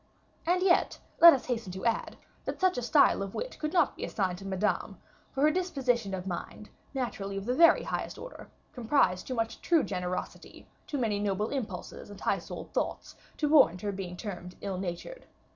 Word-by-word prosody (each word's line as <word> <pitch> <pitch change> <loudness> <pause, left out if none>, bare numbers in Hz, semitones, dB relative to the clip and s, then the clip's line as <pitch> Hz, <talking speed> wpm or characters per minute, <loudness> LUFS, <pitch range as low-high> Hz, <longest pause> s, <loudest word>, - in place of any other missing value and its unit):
And 360 +1 +2
yet, 365 -2 +3 0.2
let 340 0 +11
us 270 - 0
hasten 230 -6 -3
to 190 - -6
add, 230 -1 0 0.3
that - - -4
such 370 -1 +3
a - - -2
style 260 -2 +4
of 195 -1 -5
wit - - -5
could 305 -1 -2
not 360 - +2
be - - -7
assigned 185 -3 -1
to 195 - -10
Madame, 195 +2 -1 0.3
for 270 - -3
her 305 - +6
disposition 255 - 0
of 185 -1 -6
mind, 195 +3 -6 0.2
naturally 200 -6 -3
of 195 - -5
the 245 - 0
very 335 +5 +6
highest - - -4
order, - - -10 0.2
comprised 230 -7 +1
too 255 - -3
much 225 -1 -2
true 335 -4 +3
generosity, 180 -1 -5 0.2
too 290 - -3
many 220 -5 0
noble 205 +1 -1
impulses 210 -9 -5
and 205 - -10
high - - 0
souled - - -9
thoughts, - - -3 0.2
to 300 - +1
warrant 265 - +5
her 205 - -2
being 185 -2 -6
termed 180 -4 -7
ill 195 -2 -3
natured. 190 - -6
225 Hz, 195 wpm, -29 LUFS, 190-290 Hz, 0.3 s, let